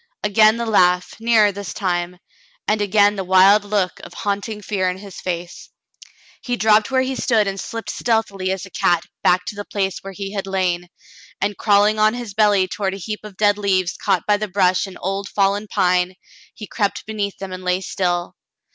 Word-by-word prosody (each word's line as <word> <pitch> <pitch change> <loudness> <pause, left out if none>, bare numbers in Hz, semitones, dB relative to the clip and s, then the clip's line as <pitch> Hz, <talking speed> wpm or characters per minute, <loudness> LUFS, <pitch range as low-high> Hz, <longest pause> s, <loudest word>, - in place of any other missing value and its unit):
Again 215 +2 +4
the 235 - -2
laugh, 180 -4 +2
nearer 225 -2 +4
this 200 0 -7
time, 180 -2 -2 0.5
and 210 0 +1
again 205 0 +3
the 195 - -2
wild 190 +3 +5
look 200 -3 -1
of - - -12
haunting 205 +1 -3
fear 190 -2 0
in 180 - -4
his 195 0 -10
face. 175 -1 -5 0.7
He 245 -2 -2
dropped 215 -2 +3
where 260 -1 +2
he 260 0 -3
stood 220 -5 +2
and 195 0 -3
slipped 230 +3 -5
stealthily 205 -5 -1
as 190 0 -4
a 185 - -14
cat 175 -1 +1 0.2
back 180 +1 +3
to - - -5
the 205 - -5
place 195 -2 -2
where 195 0 -9
he 195 +1 -6
had 195 -1 -4
lain, 180 -2 -1 0.5
and 205 +1 -1
crawling 210 +1 +3
on 215 +2 +3
his 240 -4 -6
belly 205 -3 +3
toward 195 0 -3
a - - -7
heap 210 +2 -5
of 210 -3 -11
dead 205 -1 +3
leaves 185 -3 0
caught 180 - 0
by 210 -1 +3
the 215 +1 -3
brush 185 -1 +2
of 190 - -10
an - - -12
old 195 +1 -3
fallen 200 +1 +1
pine, 180 -1 +1 0.4
he 215 - -8
crept 205 0 -2
beneath 205 -2 -3
them 195 -1 -7
and 185 0 -7
lay 180 0 +1
still. 175 -2 -2
200 Hz, 200 wpm, -20 LUFS, 185-210 Hz, 0.7 s, wild